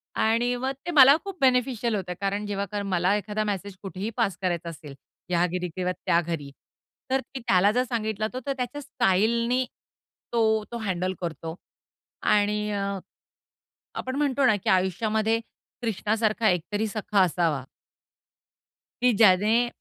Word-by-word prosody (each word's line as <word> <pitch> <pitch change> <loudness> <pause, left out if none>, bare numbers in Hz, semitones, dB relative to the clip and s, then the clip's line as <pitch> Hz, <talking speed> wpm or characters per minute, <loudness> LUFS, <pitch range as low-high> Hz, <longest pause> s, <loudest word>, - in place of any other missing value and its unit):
आणि 235 +3 +2
मग 260 +2 -2
ते 350 - -2
मला 275 -2 +8
खूप 395 -2 -7
बेनिफिशियल 250 -3 +2
होतंय. 180 -2 -4
कारण 200 +1 -1
जेव्हा 200 0 -3
मला 185 0 +1
एखादा 210 +1 -2
मेसेज 200 -1 -3
कुठेही 195 +3 -4
पास 195 - +1
करायचा 175 -2 -1
असेल, 150 -3 -10 0.3
या 175 0 +3
घरी 180 0 -3
किंवा 180 -1 -1
त्या 170 - +4
घरी. 155 -4 -5 0.6
तर 265 - +3
ती, 265 - -9
त्याला 195 0 +5
जर 250 +3 +2
सांगितलं 220 -3 -2
तो 255 - -3
तर 275 - 0
त्याच्या 255 +4 -4
स्टाईलनी, 235 +2 +1 0.7
तो 220 -2 +2
तो 235 - -4
हँडल 185 -4 -2
करतो. 165 -1 -5 0.7
आणि 210 0 +2
अ, 200 -1 -2 1.0
आपण 260 0 -4
म्हणतो 280 -1 +1
ना, 215 - +5
की - - -3
आयुष्यामध्ये 215 +4 +1 0.4
कृष्णासारखा 220 0 +1
एक 180 -2 +2
तरी 215 +2 +1
सखा 205 -1 0
असावा. 165 -6 +1 1.4
की 250 -1 +5
ज्याने, 215 +3 +5
210 Hz, 145 wpm, -26 LUFS, 185-235 Hz, 1.4 s, मला